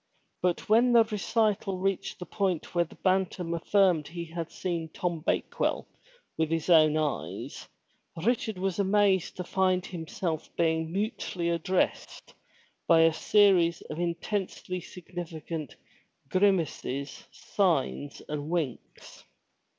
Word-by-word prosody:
But 180 -1 0
when 235 +3 +5
the 230 -1 +8
recital 215 -2 0
reached 195 0 -2
the 180 - -7
point 190 -5 -2
where 175 -1 +2
the - - -16
Bantam 185 -2 0
affirmed 175 -2 +2
he 170 +2 -6
had 165 0 -6
seen 170 -3 -3
Tom 170 +1 -2
Bakewell 155 - -1 0.5
with 160 -1 +2
his 165 +2 0
own 155 -2 +6
eyes, 150 -2 -3 0.6
Richard 225 -3 0
was 190 0 -2
amazed 195 -2 +2
to 180 - -3
find 185 0 +1
himself 165 -1 -4
being 160 -1 +1
mutely 190 -3 -2
addressed 170 +2 -1 0.5
by 165 -1 +6
a 165 0 +5
series 180 -3 +4
of 155 - -5
intensely 180 +1 -3
significant 165 -3 -7 0.5
grimaces, 170 -7 0
signs 160 -6 -1
and 150 0 -4
winks. 160 -9 -4
175 Hz, 120 wpm, -28 LUFS, 165-195 Hz, 0.6 s, the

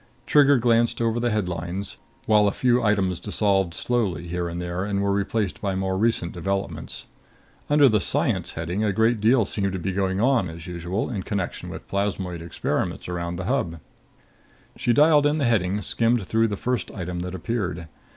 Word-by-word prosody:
Trigger 145 -1 +5
glanced 115 0 +2
over 115 0 +1
the 120 0 +1
headlines, 90 -2 -3 0.3
while 105 -1 +4
a - - +2
few 125 +3 +2
items 95 -5 +1
dissolved 95 -4 0
slowly 105 -8 -1
here 85 0 -2
and 85 +1 -5
there 90 +1 -3
and 100 -1 -1
were 100 0 +1
replaced 100 +1 -1
by 100 -3 -1
more 95 0 -1
recent 100 -4 +1
developments. 95 +3 -4 0.6
Under 145 -1 +6
the 110 -4 +3
"Science" - - 0
heading 85 +6 -2
a 105 - +2
great 110 +1 +2
deal 115 +1 +4
seemed 100 -2 -2
to - - -2
be 95 +2 -2
going 95 0 0
on, 120 -6 +2
as 80 0 -9
usual, 90 +6 -3
in 100 -5 -3
connection 95 -2 -4
with - - -9
plasmoid 95 -3 -2
experiments 85 - -3
around 85 -1 -3
the 90 +1 -5
Hub. 85 -2 -1 1.0
She 125 -1 0
dialed 150 +3 +5
in 150 +1 +1
the 145 - +1
heading, 100 -4 +1
skimmed 115 +1 +1
through 115 +4 +2
the 105 -2 -3
first 125 +2 -2
item 90 -3 -5
that 90 +1 -4
appeared. 95 -4 -3
100 Hz, 180 wpm, -24 LUFS, 90-115 Hz, 1.0 s, Under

